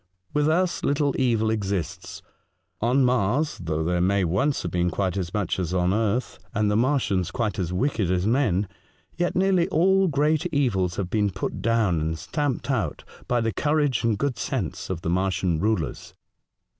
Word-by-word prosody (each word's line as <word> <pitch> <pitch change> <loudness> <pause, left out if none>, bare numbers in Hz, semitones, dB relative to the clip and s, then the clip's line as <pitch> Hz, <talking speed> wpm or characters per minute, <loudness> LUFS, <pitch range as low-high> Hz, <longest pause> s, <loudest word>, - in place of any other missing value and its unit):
With 150 +1 +2
us 180 +2 +1
little 145 -1 +1
evil 115 -4 +2
exists; 100 -6 -3 0.6
on 125 +4 +3
Mars, 125 +5 +1
though 80 -1 -1
there 90 +2 0
may 95 +2 +2
once 100 - 0
have 85 - -3
been 90 0 +1
quite 95 +1 -1
as 90 -3 -3
much 105 -2 -1
as 90 0 -2
on 90 +1 +2
earth, 115 +3 -1 0.2
and 105 -1 +2
the - - +1
Martians 115 - +1
quite 110 -4 -2
as 90 -2 -2
wicked 105 -1 0
as 90 0 +1
men, 105 -5 +2 0.5
yet 175 +1 -1
nearly 185 -2 +3
all 190 +4 +3
great 155 +2 +1
evils 115 - 0
have 95 -3 -3
been 105 -2 +2
put 95 0 -4
down 110 -8 +2
and 80 +1 -2
stamped 140 - -2
out 100 - -2 0.2
by 120 -1 +1
the 115 -1 -1
courage 145 -1 +1
and 115 -3 +1
good 130 0 -2
sense 115 -11 -3
of 90 -3 -3
the 85 - -2
Martian 90 -2 0
rulers. 100 -5 -2
110 Hz, 175 wpm, -25 LUFS, 90-140 Hz, 0.6 s, on